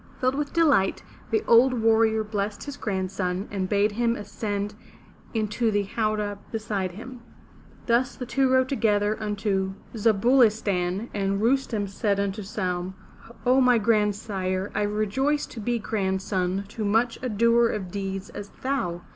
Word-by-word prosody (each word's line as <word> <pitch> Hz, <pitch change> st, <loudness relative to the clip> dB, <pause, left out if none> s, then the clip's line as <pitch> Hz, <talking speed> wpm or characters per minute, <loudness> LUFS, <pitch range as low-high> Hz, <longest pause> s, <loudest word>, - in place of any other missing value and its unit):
Filled 255 Hz, 0 st, +2 dB
with 290 Hz, +1 st, -2 dB
delight, 295 Hz, -, +3 dB, 0.3 s
the 440 Hz, -, +1 dB
old 250 Hz, +3 st, +6 dB
warrior 220 Hz, -1 st, +3 dB
blessed 205 Hz, -1 st, -3 dB
his 285 Hz, -1 st, -6 dB
grandson 190 Hz, -4 st, -2 dB
and 190 Hz, -2 st, -2 dB
bade 205 Hz, +1 st, +2 dB
him 235 Hz, +2 st, +1 dB
ascend 205 Hz, -1 st, -4 dB, 0.6 s
into 220 Hz, +1 st, 0 dB
the 205 Hz, -1 st, +1 dB
howdah 210 Hz, -1 st, -2 dB
beside 210 Hz, -5 st, -2 dB
him. 245 Hz, +5 st, -9 dB, 0.6 s
Thus 245 Hz, +2 st, +2 dB
the 250 Hz, -, -6 dB
two 265 Hz, +2 st, +1 dB
rode 260 Hz, 0 st, +3 dB
together 215 Hz, -5 st, +1 dB
unto 200 Hz, -2 st, -1 dB, 0.2 s
Za 220 Hz, 0 st, +3 dB
bu' 240 Hz, +7 st, +3 dB
li 240 Hz, -4 st, +8 dB
stan'. 200 Hz, 0 st, -2 dB
And 195 Hz, -1 st, 0 dB
Rustem 230 Hz, -2 st, +1 dB
said 200 Hz, 0 st, -1 dB
unto 200 Hz, +1 st, -2 dB
Saimi; 185 Hz, -2 st, -3 dB, 0.5 s
0, 255 Hz, +2 st, +4 dB
my 250 Hz, -2 st, +5 dB
grandsire, 205 Hz, -3 st, 0 dB
I 210 Hz, -, 0 dB
rejoice 215 Hz, +8 st, 0 dB
to 230 Hz, -, -10 dB
be 240 Hz, +3 st, 0 dB
grandson 190 Hz, -3 st, -1 dB
to 210 Hz, -1 st, -2 dB
such 230 Hz, +1 st, +2 dB
a 255 Hz, -, -2 dB
doer 235 Hz, +2 st, +4 dB
of 190 Hz, -4 st, -4 dB
deeds 195 Hz, 0 st, -4 dB
as 200 Hz, -, -8 dB
thou. 185 Hz, -11 st, -1 dB
210 Hz, 155 wpm, -25 LUFS, 195-235 Hz, 0.6 s, li